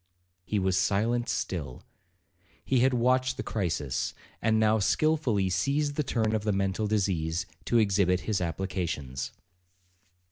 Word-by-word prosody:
He 105 - -2
was 95 -1 +2
silent 110 +5 +1
still. 75 -9 -3 0.8
He 130 - +2
had 130 +2 +4
watched 130 +1 +2
the 130 - -3
crisis, 80 - -2 0.3
and 110 0 +2
now 110 0 +3
skilfully 125 -4 +2
seized 140 +10 +1
the 150 - 0
turn 115 -6 0
of 110 -1 0
the 105 - +1
mental 100 +2 0
disease, 90 -6 0 0.2
to 120 - +2
exhibit 95 -4 +3
his 105 -2 -1
applications. 85 -7 -3
105 Hz, 135 wpm, -28 LUFS, 90-120 Hz, 0.8 s, had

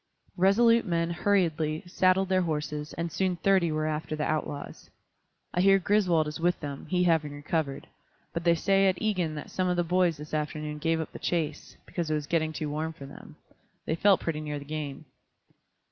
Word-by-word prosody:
Resolute 230 +5 +5
men 170 -3 0
hurriedly 165 -4 +1
saddled 185 +2 +2
their 185 0 +2
horses, 150 -2 -3
and 170 0 -3
soon 185 +1 0
thirty 175 -1 +2
were 155 0 -1
after 155 0 -2
the 150 - -2
outlaws. 150 -2 -4 0.6
I 180 - +2
hear 195 +1 +6
Griswold 180 -5 +2
is 150 - -5
with 175 +1 +1
them, 140 -2 -6
he 180 -1 +1
having 160 -4 +2
recovered. 145 -1 -2 0.5
But 170 - -3
they 170 -1 +4
say 195 +3 +3
at 185 -1 +1
Egan 185 -8 0
that 150 - -7
some 185 -1 0
of 180 0 0
the 175 - +2
boys 175 -1 +2
this 150 +1 -10
afternoon 150 0 -3
gave 165 +1 +1
up 160 - -4
the - - -9
chase, 160 -4 -2
because 170 -3 -3
it 155 - +1
was 150 -1 -2
getting 160 0 0
too 155 -1 -4
warm 160 +2 -2
for 140 -3 -10
them; 135 - -12 0.5
they - - -1
felt 195 +3 +4
pretty 155 -2 -2
near 150 -1 -4
the 140 - -8
game." 150 -1 -5
165 Hz, 195 wpm, -28 LUFS, 150-180 Hz, 0.6 s, hear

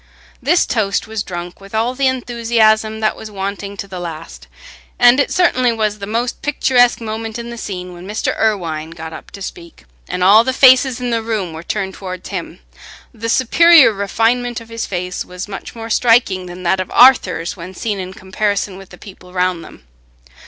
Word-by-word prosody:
This 310 +8 +3
toast 205 -4 -1
was 220 -1 -4
drunk 175 -1 -7
with 195 +2 -10
all 230 +3 0
the 270 +1 +1
enthusiasm 225 -3 +1
that 215 - +1
was 220 - -9
wanting 200 0 -5
to 200 - -6
the 185 -2 -7
last, 165 -2 -8 0.5
and 245 +2 +6
it 280 - +1
certainly 255 -9 +2
was 215 -2 -1
the 200 - -6
most 235 +3 -2
picturesque 250 -4 +2
moment 225 0 -5
in 235 0 -7
the - - -6
scene 180 -4 -6
when 175 +1 -11
Mr. 210 +2 -2
Irwine 165 -7 -1
got 160 -1 -8
up - - -10
to 200 - -9
speak, 170 - -10 0.2
and 180 - -2
all 205 +4 +7
the 260 +1 -1
faces 260 -1 +5
in 245 -1 -3
the 230 -1 0
room 215 -7 -3
were 160 - -7
turned 190 +2 -3
towards 185 -2 -7
him. 180 - -6 0.5
The 230 +1 -5
superior 290 +2 +6
refinement 230 +5 0
of 230 0 -14
his 230 0 -4
face 180 -1 -4
was 180 +2 -8
much 200 +3 -8
more 225 0 -7
striking 225 -6 +3
than 180 +1 -9
that 185 +2 +1
of 185 - -3
Arthur's 195 -9 +4
when 185 +1 -9
seen 205 +1 -3
in 185 0 -5
comparison 200 0 -2
with 195 - -13
the 180 - -13
people 185 -2 -14
round 180 -2 0
them. - - -14
210 Hz, 195 wpm, -17 LUFS, 185-235 Hz, 0.5 s, all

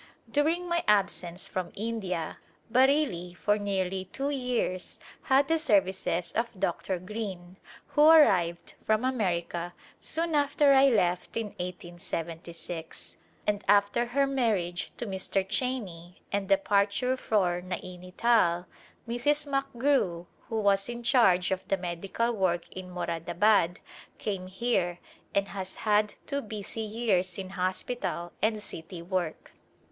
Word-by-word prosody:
During 325 +5 +1
my 340 -1 0
absence 185 -4 +1
from 185 -2 -4
India, 195 -7 -3 0.3
Bareilly 255 - +2
for 210 0 +1
nearly 190 -2 -1
two 275 +9 -3
years 250 -9 -2 0.2
had 270 0 +3
the 325 0 +2
services 190 - +1
of 230 -3 -2
Dr. 190 -1 -1
Green, 185 -2 -6 0.3
who 295 +1 +5
arrived 180 - +5
from 215 +3 +2
America 175 -7 -1 0.2
soon 330 +1 -2
after 285 -1 +4
I 270 0 +7
left 180 -6 +1
in 225 -2 -2
1876, 175 -2 -6 0.3
and 205 -1 0
after 205 +4 +4
her 275 +3 +2
marriage 215 -10 0
to - - -4
Mr. 190 -1 -1
Cheney 190 -9 -3
and 200 -1 -1
departure 200 +5 +2
for 185 -8 +1
Naini 180 0 -7
Tal, 180 -7 +3 0.4
Mrs. 290 +6 +1
McGrew, 275 -10 0 0.2
who 225 - -1
was 200 0 +2
in 240 0 -5
charge 195 -9 +4
of 190 -1 -2
the 195 - +1
medical 190 +6 -2
work 185 -6 0
in 185 -1 -8
Moradabad, 175 +2 +1 0.4
came 190 -3 -3
here 185 -3 0 0.4
and 200 0 +1
has 190 -1 -5
had 210 0 +3
two 280 -1 -2
busy 215 0 -5
years 210 -5 0
in 190 -1 -6
hospital 185 -1 -2
and 215 0 +2
city 170 0 -7
work. 175 -3 -3
200 Hz, 125 wpm, -29 LUFS, 180-240 Hz, 0.4 s, I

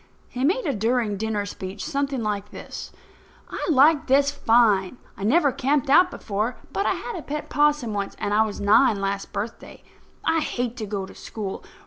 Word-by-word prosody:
He 255 - -4
made 365 - +2
a 285 - 0
during 225 -1 0
dinner 210 0 -2
speech 195 0 -6
something 275 -4 -2
like 205 -1 -2
this: - - -8 0.6
"I - - -4
like 295 +1 +5
this 280 +2 +4
fine. 225 -6 +3 0.2
I - - -8
never 285 +6 +4
camped 275 +2 0
out 360 +5 +6
before; 215 - -3 0.2
but 395 - 0
I - - +3
had 470 - -6
a 345 - -5
pet 300 +1 -5
'possum 295 -6 +2
once, 200 -1 -3
and 205 - -1
I 215 - +4
was 215 -2 -5
nine 215 +2 +4
last 195 0 -3
birthday. 215 +3 -6 0.4
I 325 0 +3
hate 245 -5 -2
to 215 -3 -4
go 200 -2 -3
to - - -13
school. 205 -4 -6
235 Hz, 185 wpm, -24 LUFS, 205-285 Hz, 0.6 s, out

